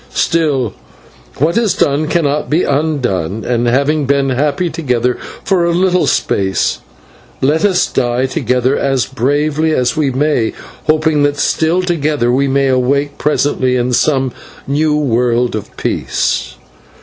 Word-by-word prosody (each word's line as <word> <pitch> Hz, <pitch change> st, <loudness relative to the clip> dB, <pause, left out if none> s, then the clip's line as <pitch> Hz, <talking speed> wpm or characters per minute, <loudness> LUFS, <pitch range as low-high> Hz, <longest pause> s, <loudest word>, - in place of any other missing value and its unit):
Still, 145 Hz, -, +1 dB, 0.6 s
what 165 Hz, -, +2 dB
is 215 Hz, -6 st, +1 dB
done 150 Hz, -5 st, +1 dB
cannot 150 Hz, -3 st, 0 dB
be 160 Hz, +4 st, +2 dB
undone, 125 Hz, -, -1 dB
and, 120 Hz, -1 st, 0 dB
having 140 Hz, +4 st, +1 dB
been 140 Hz, -1 st, +1 dB
happy 145 Hz, +6 st, 0 dB
together 125 Hz, -7 st, -1 dB, 0.2 s
for 190 Hz, -3 st, +1 dB
a 170 Hz, -, +1 dB
little 180 Hz, 0 st, +2 dB
space, 95 Hz, -1 st, 0 dB, 0.6 s
let 150 Hz, +5 st, +1 dB
us 190 Hz, -3 st, +3 dB
die 125 Hz, 0 st, 0 dB
together 130 Hz, -1 st, 0 dB
as 135 Hz, -2 st, 0 dB
bravely 145 Hz, +5 st, 0 dB
as 125 Hz, +2 st, 0 dB
we 155 Hz, -3 st, +1 dB
may, 130 Hz, -3 st, 0 dB, 0.3 s
hoping 155 Hz, -1 st, +2 dB
that 145 Hz, 0 st, +1 dB
still 165 Hz, +5 st, +1 dB
together 150 Hz, -8 st, 0 dB
we 135 Hz, +3 st, +2 dB
may 135 Hz, 0 st, +1 dB
awake 135 Hz, +3 st, 0 dB
presently 140 Hz, -3 st, +1 dB
in 125 Hz, 0 st, 0 dB
some 135 Hz, 0 st, +1 dB, 0.3 s
new 150 Hz, +2 st, +1 dB
world 125 Hz, -3 st, +1 dB
of 110 Hz, -, -7 dB
peace." -, -, -2 dB
140 Hz, 135 wpm, -15 LUFS, 125-155 Hz, 0.6 s, us